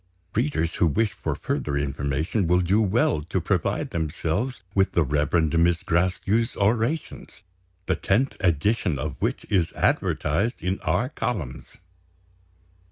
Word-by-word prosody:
Readers 110 - 0
who 85 - +4
wish 110 +8 +1
for - - -3
further 70 -1 -2
information 70 +7 -1
will 90 +1 +3
do 95 +5 +2
well 100 -6 +2
to 75 - -2
provide - - -1
themselves 85 - -2
with 95 0 +2
the 85 - +3
Reverend 75 +3 +1
Miss 85 -1 +2
Gracedieu's 95 +7 +1
Orations 115 +3 -1 0.4
the - - +1
tenth 125 +8 +1
edition 90 -1 +1
of 75 0 -4
which - - -1
is 90 -5 +1
advertised 95 - 0
in 95 +2 -1
our 125 - 0
columns." 120 - -4
90 Hz, 130 wpm, -25 LUFS, 80-110 Hz, 0.4 s, who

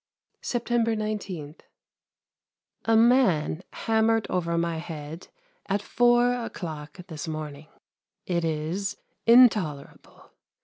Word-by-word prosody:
September 235 -1 0
19. 195 -8 -4 1.3
A 225 0 +4
man 225 - +3
hammered 225 -1 +1
over 170 -2 0
my 170 -1 0
head 160 0 -7 0.4
at 200 +1 +1
four 240 +1 +3
o'clock 160 -11 -6
this 165 -2 -7
morning. 155 -1 -6 0.6
It 170 -2 -1
is 165 +5 -2 0.3
intolerable. 210 - +3
180 Hz, 90 wpm, -26 LUFS, 155-225 Hz, 1.3 s, A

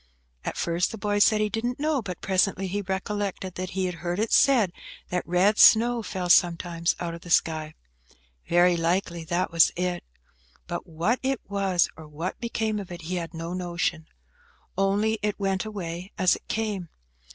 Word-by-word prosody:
At - - -4
first 170 +1 0
the 225 - -6
boy 205 0 0
said 215 +1 +4
he 210 - +1
didn't 240 +5 -2
know, 300 -2 +1
but 185 -6 -7
presently 190 0 +1
he 200 +2 -2
recollected 195 -1 -3
that 185 0 -5
he 190 - +1
had 180 - -2
heard 175 0 -2
it 220 +2 -1
said, 230 -10 +4 0.4
that 180 0 0
red 185 +5 +3
snow 235 +1 +6
fell 185 -4 -4
sometimes 170 -1 +3
out 170 -1 -3
of 170 - -8
the 175 - -11
sky. 155 -2 +1 0.7
Very 175 +1 +5
likely 170 0 -1
that 175 +2 -1
was 165 -1 +5
it; 180 0 -2 0.6
but 175 +2 -5
what 170 +9 0
it 270 -2 0
was, 195 -3 +1
or 160 -1 -11
what 160 +5 -5
became 220 -2 -1
of 195 -3 -8
it, 175 -1 -8
he 180 +3 -3
had 165 -1 -5
no 165 +1 -5
notion. 175 -2 -2 0.7
Only 205 +3 +1
it 210 -1 -2
went 195 0 0
away 185 -3 -6
as 185 -1 +4
it - - -14
came. 210 -6 -2
185 Hz, 180 wpm, -26 LUFS, 175-210 Hz, 0.7 s, snow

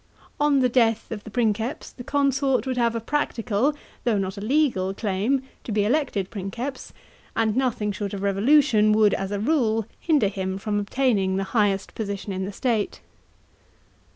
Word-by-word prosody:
On 290 -2 +3
the 255 - +4
death 230 -3 +1
of 210 -2 -5
the - - -7
Princeps, 230 +3 -1
the 245 - -10
consort 275 -1 +1
would 260 -1 -1
have 235 -1 +2
a - - 0
practical, 245 0 0 0.3
though 230 -4 +2
not 190 0 -2
a 200 - -7
legal 215 -7 +1
claim, 220 +7 0 0.2
to - - -6
be 205 -1 +2
elected 220 -7 0
Princeps, 235 +7 -5 0.4
and 220 -1 +1
nothing 245 -5 0
short 200 0 -4
of 195 - -5
revolution 215 +2 +4
would, 215 -1 +4
as 195 0 -2
a 205 0 -2
rule, 225 -4 +1
hinder 300 -10 +2
him 190 -1 -3
from 205 +1 -1
obtaining 205 -3 +1
the 195 - 0
highest 205 -4 +1
position 200 -2 -4
in 190 0 -3
the 200 - -5
state. 220 0 -1
220 Hz, 170 wpm, -24 LUFS, 200-260 Hz, 0.4 s, the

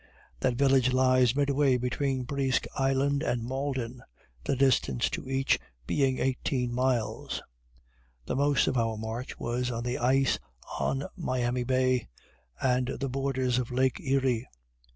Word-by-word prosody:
That 130 -2 +1
village 135 -1 +4
lies 130 -1 +4
midway 140 -2 +3
between 130 +1 -1
Presque 135 -1 0
Isle 135 0 +2 0.2
and 120 -6 -1
Malden, 130 -1 -3 0.4
the - - 0
distance 125 - +2
to - - -5
each 135 0 +2 0.3
being 135 - +1
eighteen 130 -1 -1
miles. 125 -2 -1 0.8
The - - -2
most 140 +1 +3
of 130 - 0
our 115 -1 0
march 110 +3 -5
was 125 +1 -2
on 115 -1 -3
the 125 0 -2
ice 135 +3 +2 0.4
on 135 +1 0
Miami 125 -7 -1
bay, 130 -1 +1 0.5
and 125 -1 +1
the 135 - -2
borders 130 -1 0
of 125 - -3
lake 130 +1 +1
Erie. 130 -3 0
130 Hz, 135 wpm, -29 LUFS, 125-135 Hz, 0.8 s, village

